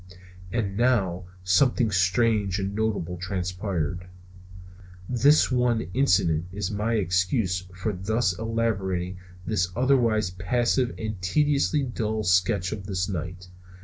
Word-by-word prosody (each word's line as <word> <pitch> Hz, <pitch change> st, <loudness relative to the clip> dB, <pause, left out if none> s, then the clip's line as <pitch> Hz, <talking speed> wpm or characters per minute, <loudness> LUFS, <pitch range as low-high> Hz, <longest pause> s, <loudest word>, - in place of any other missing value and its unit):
And 100 Hz, -4 st, -2 dB
now 100 Hz, -8 st, +1 dB, 0.2 s
something 115 Hz, +5 st, +3 dB
strange 95 Hz, +2 st, +2 dB
and 100 Hz, 0 st, -3 dB
notable 100 Hz, -5 st, -2 dB
transpired. 90 Hz, -1 st, -3 dB, 1.0 s
This 135 Hz, +4 st, +4 dB
one 125 Hz, -5 st, +1 dB
incident 90 Hz, -, +2 dB
is 100 Hz, +1 st, -3 dB
my 105 Hz, +3 st, -1 dB
excuse 90 Hz, -1 st, 0 dB
for 100 Hz, +4 st, -2 dB
thus 95 Hz, +1 st, 0 dB
elaborating 95 Hz, -6 st, -2 dB, 0.3 s
this 100 Hz, -5 st, 0 dB
otherwise 115 Hz, -6 st, +2 dB
passive 120 Hz, +7 st, 0 dB
and 110 Hz, -4 st, -5 dB
tediously 145 Hz, -, +1 dB
dull 110 Hz, -3 st, -2 dB
sketch 90 Hz, +1 st, +2 dB
of 100 Hz, -3 st, -6 dB
this 90 Hz, -2 st, -1 dB
night. 90 Hz, -1 st, -5 dB
100 Hz, 115 wpm, -25 LUFS, 90-115 Hz, 1.0 s, This